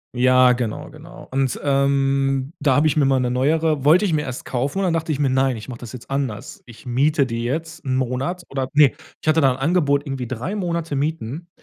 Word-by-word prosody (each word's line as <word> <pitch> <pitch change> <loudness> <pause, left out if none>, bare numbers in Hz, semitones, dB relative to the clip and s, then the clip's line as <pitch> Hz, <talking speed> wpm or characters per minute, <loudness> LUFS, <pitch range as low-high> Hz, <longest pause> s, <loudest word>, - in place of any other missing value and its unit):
Ja, 125 0 +5
genau, 120 -3 -4
genau. 165 +4 -13
Und, 135 -2 0
ähm, 135 0 +1
da 140 -3 +3
habe 155 +2 +4
ich - - +1
mir 150 - +3
mal 135 -1 +3
'ne 125 -1 0
neuere 150 +3 +1
wollte 170 +8 +5
ich 175 - 0
mir 150 - +1
erst 130 -3 -6
kaufen 135 +7 -2
und 195 - +1
dann 175 - +1
dachte 160 -1 -1
ich 145 - -2
mir: 140 -2 +2
„Nein, 130 -1 +1
ich 110 - -9
mach 125 -3 -7
das 120 -2 -9
jetzt 125 0 -11
anders. 135 -1 -4
Ich 120 +2 -15
miete 140 +4 +2
die 115 -1 -4
jetzt 160 +6 -4
'n 130 -1 0
Monat 130 +8 -2
oder 135 -1 -3
"ne, 145 -2 +5 0.3
ich - - -11
hatte 155 +1 +4
da 135 -2 +4
'n 125 - -4
Angebot 145 -1 +1
irgendwie 130 -3 -4
3 130 - -4
Monate 170 -5 -2
mieten 150 +2 -3
135 Hz, 230 wpm, -21 LUFS, 130-155 Hz, 0.3 s, Ja